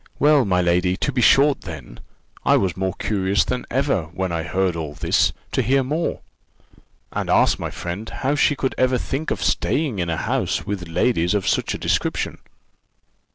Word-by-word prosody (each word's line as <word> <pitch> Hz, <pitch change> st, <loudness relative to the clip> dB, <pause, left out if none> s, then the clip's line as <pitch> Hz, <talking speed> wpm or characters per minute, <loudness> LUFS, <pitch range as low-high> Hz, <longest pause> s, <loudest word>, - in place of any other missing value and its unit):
"Well, 145 Hz, -2 st, +4 dB
my 90 Hz, -2 st, +2 dB
lady, 90 Hz, +1 st, +2 dB
to 140 Hz, -, -1 dB
be 125 Hz, -2 st, 0 dB
short, 140 Hz, +4 st, +5 dB
then 70 Hz, -9 st, -9 dB, 0.4 s
I -, -, +4 dB
was 95 Hz, -4 st, 0 dB
more 95 Hz, 0 st, -2 dB
curious 100 Hz, -2 st, +1 dB
than 125 Hz, 0 st, -3 dB
ever, 130 Hz, -, 0 dB
when 90 Hz, +3 st, -4 dB
I 85 Hz, -1 st, -1 dB
heard 95 Hz, +1 st, 0 dB
all 75 Hz, -3 st, -5 dB
this, -, -, +2 dB, 0.2 s
to -, -, +1 dB
hear 135 Hz, +3 st, +2 dB
more; 155 Hz, +6 st, -2 dB, 0.9 s
and -, -, -3 dB
asked -, -, +3 dB
my -, -, -3 dB
friend 90 Hz, +6 st, -6 dB
how 135 Hz, +2 st, -1 dB
she 145 Hz, 0 st, +3 dB
could 130 Hz, -1 st, -1 dB
ever 130 Hz, 0 st, +3 dB
think 135 Hz, +5 st, -3 dB
of 90 Hz, -, -2 dB
staying 105 Hz, -, 0 dB
in 85 Hz, -1 st, -1 dB
a 80 Hz, -, -1 dB
house -, -, -1 dB
with 95 Hz, -4 st, -4 dB
ladies 85 Hz, +1 st, +1 dB
of 100 Hz, -, -1 dB
such -, -, 0 dB
a -, -, -4 dB
description! -, -, -1 dB
95 Hz, 185 wpm, -22 LUFS, 90-130 Hz, 0.9 s, short